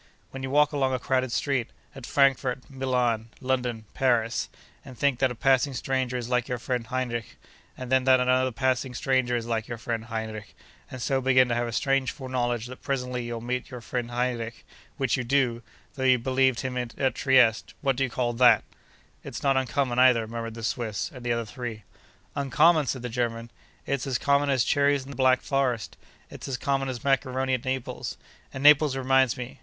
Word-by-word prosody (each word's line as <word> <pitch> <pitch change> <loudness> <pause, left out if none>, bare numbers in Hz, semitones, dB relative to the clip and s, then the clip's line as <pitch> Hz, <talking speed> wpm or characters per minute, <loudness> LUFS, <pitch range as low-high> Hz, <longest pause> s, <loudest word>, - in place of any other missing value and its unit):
When 135 - -7
you 130 - -4
walk 150 +2 +4
along 135 -3 0
a - - -3
crowded 130 0 0
street—at 135 -1 -3
Frankfort, 135 -2 +2
Milan, 125 -4 0
London, 125 -4 -2
Paris—and 120 +1 -2
think 140 0 +1
that 130 - +3
a 125 - -6
passing 135 +2 +2
stranger 130 -1 -1
is 120 -2 -4
like 125 -1 0
your 125 - -2
friend 120 -1 -3
Heinrich, 120 -2 -3 0.4
and 130 -1 -7
then 130 -1 +3
that 130 -1 +6
another 130 +1 +2
passing 130 0 -1
stranger 130 -2 +1
is 115 -1 -2
like 115 -1 -2
your 120 - -5
friend 115 -1 -4
Heinrich, 110 -2 -6 0.3
and 130 - -8
so 135 -1 +1
begin 130 -1 +4
to - - +1
have 120 0 0
a - - -4
strange 135 +3 +1
foreknowledge 125 -4 -2
that 125 +1 -10
presently 125 -2 -3
you'll 120 -1 -5
meet 125 +1 -3
your 125 - -7
friend 120 0 -4
Heinrich—which 120 +2 -3
you 125 - -2
do, 125 -2 +1 0.3
though 135 - -5
you 130 -1 +5
believed 130 0 +1
him 130 -1 -3
at 120 -1 -5 0.2
Trieste—what 130 +1 +2
do 135 - 0
you 130 - -1
call 120 0 -1
that?' 120 -2 +5 0.6
'It's - - -7
not 135 -1 +3
uncommon, 130 -1 0
either,' 125 -3 +5
murmured 115 0 -5
the 115 - -8
Swiss 110 -3 -2
and 125 - -10
the 120 - -1
other 115 -1 -1
three. 110 -1 -7 0.5
'Uncommon!' 150 +3 +3
said 130 -2 -3
the - - -2
German. 115 -1 -3 0.3
'It's 140 -1 -2
as 130 -3 0
common 140 0 +2
as 130 -4 +3
cherries 140 -1 +2
in 135 - -10
the - - -8
Black 130 -1 +3
Forest. 130 -5 -1 0.4
It's - - -8
as 130 -2 -2
common 135 0 -1
as 125 -3 -5
maccaroni 130 -1 +1
at 130 -1 -2
Naples. 130 -1 -4 0.3
And 135 - -6
Naples 145 -1 +6
reminds 130 -1 +2
me! 125 0 -7
125 Hz, 190 wpm, -26 LUFS, 120-135 Hz, 0.6 s, that